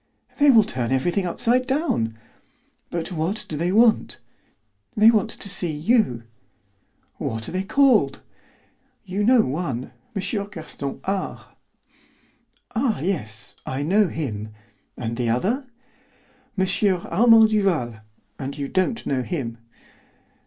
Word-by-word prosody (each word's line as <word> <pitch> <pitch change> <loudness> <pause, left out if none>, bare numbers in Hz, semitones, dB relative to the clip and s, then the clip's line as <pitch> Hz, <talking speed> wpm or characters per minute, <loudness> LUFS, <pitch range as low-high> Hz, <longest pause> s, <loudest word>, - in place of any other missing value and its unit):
"They 290 0 +6
will 230 -5 +7
turn 125 - -3
everything 175 +8 +1
upside 245 +8 +1
down." 260 - 0 0.7
"But 170 +1 -3
what 175 +5 -2
do 155 - -5
they 170 +4 0
want?" 225 +2 +3 0.8
"They 215 +2 +8
want 215 -4 +1
to - - -3
see 180 -3 -1
you." 150 - +1 0.9
"What 110 -1 -4
are - - -6
they 185 - -1
called?" 220 - +3 0.9
"You 195 +3 -2
know 245 +2 +6
one, 135 -4 -3 0.2
M. 195 - -1 0.3
Gaston 155 -6 -6
R." 195 0 -4 1.2
"Ah, 230 -1 0
yes, 110 - -4
I 135 +2 -3
know 200 +6 +3
him. 110 -10 -4 0.5
And 115 -1 -4
the 120 -2 0
other?" 220 - 0 0.9
"M. 190 - +3 0.4
Armand 225 +4 +6
Duval; 175 - 0 0.4
and 140 +1 -5
you 140 -1 -3
don't 190 +5 0
know 130 -2 0
him." 125 -6 -4
175 Hz, 125 wpm, -23 LUFS, 130-215 Hz, 1.2 s, They